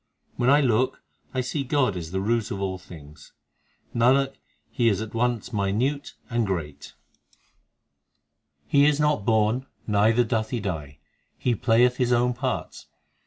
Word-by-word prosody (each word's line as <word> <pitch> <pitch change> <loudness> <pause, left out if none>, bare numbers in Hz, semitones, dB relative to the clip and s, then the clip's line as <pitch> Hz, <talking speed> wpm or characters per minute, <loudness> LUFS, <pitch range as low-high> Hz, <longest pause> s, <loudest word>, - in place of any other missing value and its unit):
When 120 +1 +1
I 145 +2 +6
look 125 -1 +1 0.3
I 130 - -1
see 140 +3 -2
God 130 -6 +1
is 85 -3 -5
the 95 +2 -2
root 115 +1 0
of 100 - -4
all 95 -1 -3
things; 75 -5 -14 0.6
Nanak, 135 +3 +3 0.4
He 120 -2 +2
is 100 -3 0
at 110 -1 -6
once 120 0 -1
minute 110 +8 -1
and 115 -2 0
great; 80 -7 -5 1.7
He 140 0 +4
is 150 -1 +2
not 150 -9 +1
born, 110 +3 +1 0.2
neither 110 +3 +3
doth 110 -2 -1
He 120 - -2
die; 80 -8 -5 0.4
He 125 - 0
playeth 120 +2 +3
His 125 -1 +1
own 125 +1 +3
parts. 120 - -4
115 Hz, 150 wpm, -25 LUFS, 100-125 Hz, 1.7 s, I